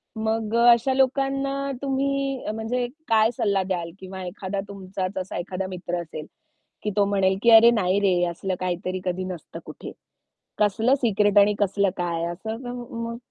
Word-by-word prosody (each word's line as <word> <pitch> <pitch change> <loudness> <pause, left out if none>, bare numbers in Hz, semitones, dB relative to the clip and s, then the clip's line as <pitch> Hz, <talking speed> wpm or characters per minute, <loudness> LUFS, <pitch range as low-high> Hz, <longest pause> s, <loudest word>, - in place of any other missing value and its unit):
मग 220 0 -1
अ, 235 0 +4
अशा 235 +3 +3
लोकांना 275 +1 0
तुम्ही 275 -2 -1
म्हणजे 240 +3 -2 0.2
काय 220 0 +4
सल्ला 200 -5 +1
द्याल 175 -3 -3
किंवा 190 0 -8
एखादा 195 +1 -4
तुमचाच 190 -1 -5
असा 185 0 -4
एखादा 185 +1 -4
मित्र 175 -1 -4
असेल, 155 -2 -8 0.6
की 210 - -1
तो 200 - +5
म्हणेल, 195 -1 +2
की 235 - +5
अरे, 230 +1 +9
नाही 195 -3 +2
रे! 185 -3 +3
असलं 185 +2 -3
काहीतरी 185 0 -3
कधी 180 +1 -1
नसतं 180 -4 -7
कुठे. - - -9 0.7
कसलं 220 +5 +3
सिक्रेट 205 -3 +2
आणि 205 +1 +5
कसलं 200 0 +2
काय 170 -2 -1
असं 220 +6 -5 0.4
मग 230 0 -4
200 Hz, 160 wpm, -24 LUFS, 185-235 Hz, 0.7 s, अरे